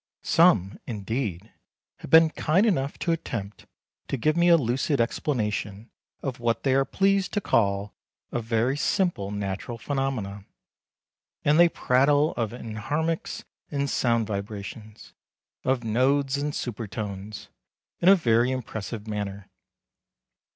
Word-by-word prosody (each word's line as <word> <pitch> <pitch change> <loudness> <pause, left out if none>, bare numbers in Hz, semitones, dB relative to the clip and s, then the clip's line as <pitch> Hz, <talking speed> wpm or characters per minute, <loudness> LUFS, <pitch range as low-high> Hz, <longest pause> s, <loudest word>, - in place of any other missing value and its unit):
Some, 160 - +3
indeed, 110 -2 -4 0.4
have - - -10
been 160 +1 +7
kind 170 +9 +2
enough 145 -10 0
to 170 - -1
attempt 115 -11 -4 0.4
to 135 - -2
give 155 +6 +1
me 170 0 +3
a 170 - +7
lucid 135 +2 0
explanation 110 -4 -2 0.3
of 130 -3 -4
what 115 -1 0
they 135 - +2
are 135 0 +3
pleased 195 +5 +1
to 205 - +1
call 100 - +1 0.4
a 120 - -1
very 115 +3 0
simple 175 - 0
natural 100 +3 -4
phenomenon, 115 -7 -3 1.0
and 150 +3 +4
they 175 0 +7
prattle 145 +3 +3
of 115 -2 -2
enharmonics 125 +9 -3 0.3
and 140 -1 -1
sound 115 -2 +1
vibrations, 105 +1 -7 0.5
of 130 -2 0
nodes 135 +5 +2
and 145 +1 -2
super 115 -2 -4
tones, 100 0 -6 0.5
in 175 - +5
a 195 - +9
very 120 -7 +2
impressive 115 -4 -5
manner. 100 -2 -5
120 Hz, 130 wpm, -26 LUFS, 105-145 Hz, 1.0 s, a